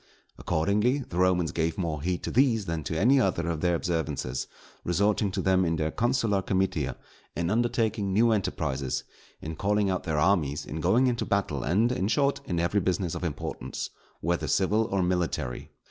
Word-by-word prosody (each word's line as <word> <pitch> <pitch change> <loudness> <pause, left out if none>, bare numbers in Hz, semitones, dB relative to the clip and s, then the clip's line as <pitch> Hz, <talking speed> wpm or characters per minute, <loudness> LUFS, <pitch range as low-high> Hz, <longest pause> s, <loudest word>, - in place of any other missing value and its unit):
Accordingly, 105 - +1
the 85 - -6
Romans 90 -3 +2
gave 80 0 -1
more 80 -5 -2
heed 90 +2 -2
to - - -3
these 115 -5 +3
than 85 -2 -3
to 80 - -2
any 130 +7 +5
other 95 -5 0
of 80 -2 -2
their 85 -1 +2
observances; 80 -7 -2 0.4
resorting 100 +3 +1
to 95 - -3
them 95 -1 +3
in 85 -1 +1
their 80 0 -1
consular 115 -4 +1
comitia; 95 -6 -1 0.4
in 85 +2 -1
undertaking 110 -3 0
new 115 +4 +4
enterprises; 70 - -1 0.4
in 80 +1 -5
calling 100 +2 +1
out 90 - -1
their 80 -3 -1
armies; 75 -3 +1
in 80 +1 -5
going 125 +10 +3
into 120 -2 +1
battle; 100 -2 -1
and, 110 +7 +2
in 125 -6 0
short, 140 +4 +1
in 85 -2 -1
every 85 +4 +1
business 90 -2 -1
of - - -5
importance, 80 -5 -4 0.3
whether 85 0 -1
civil 105 +4 +2
or 95 -3 0
military. 90 -8 -2
95 Hz, 175 wpm, -27 LUFS, 80-105 Hz, 0.4 s, any